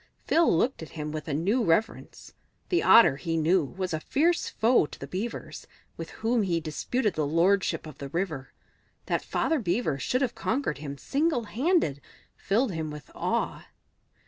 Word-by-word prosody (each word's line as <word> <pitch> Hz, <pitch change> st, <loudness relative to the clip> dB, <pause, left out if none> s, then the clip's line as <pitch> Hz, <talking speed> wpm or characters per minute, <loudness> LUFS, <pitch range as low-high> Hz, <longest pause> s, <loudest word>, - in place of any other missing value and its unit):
Phil 335 Hz, 0 st, +4 dB
looked 235 Hz, +9 st, +1 dB
at 160 Hz, -, -8 dB
him 150 Hz, 0 st, -4 dB
with 155 Hz, +1 st, -6 dB
a 150 Hz, -, -2 dB
new 205 Hz, -, +1 dB
reverence. 215 Hz, +5 st, -1 dB, 0.4 s
The 350 Hz, -, +2 dB
Otter, 230 Hz, -12 st, +7 dB
he 165 Hz, +2 st, -2 dB
knew, 165 Hz, +3 st, +3 dB
was 185 Hz, +5 st, -4 dB
a 160 Hz, -, -1 dB
fierce 330 Hz, -, +1 dB
foe 225 Hz, -7 st, +3 dB
to 140 Hz, -, -9 dB
Beavers, 195 Hz, -, -6 dB, 0.3 s
with -, -, -7 dB, 0.2 s
whom 235 Hz, 0 st, +3 dB
he 175 Hz, -4 st, 0 dB
disputed 200 Hz, -, -1 dB
the 155 Hz, -3 st, -1 dB
lordship 170 Hz, +2 st, +2 dB
of 155 Hz, -3 st, -11 dB
the 140 Hz, -, -6 dB
river; 160 Hz, -5 st, -3 dB, 0.5 s
that -, -, 0 dB
Father 320 Hz, -2 st, 0 dB
Beaver 175 Hz, -, -1 dB
should 255 Hz, -, 0 dB
have 245 Hz, -2 st, -1 dB
conquered 225 Hz, -, -2 dB
him 140 Hz, -1 st, -6 dB
single 280 Hz, -, 0 dB
handed 230 Hz, -, 0 dB, 0.3 s
filled 220 Hz, +4 st, 0 dB
him 160 Hz, -3 st, -3 dB
with 150 Hz, -1 st, -10 dB
awe. -, -, -2 dB
185 Hz, 170 wpm, -27 LUFS, 155-240 Hz, 0.5 s, Otter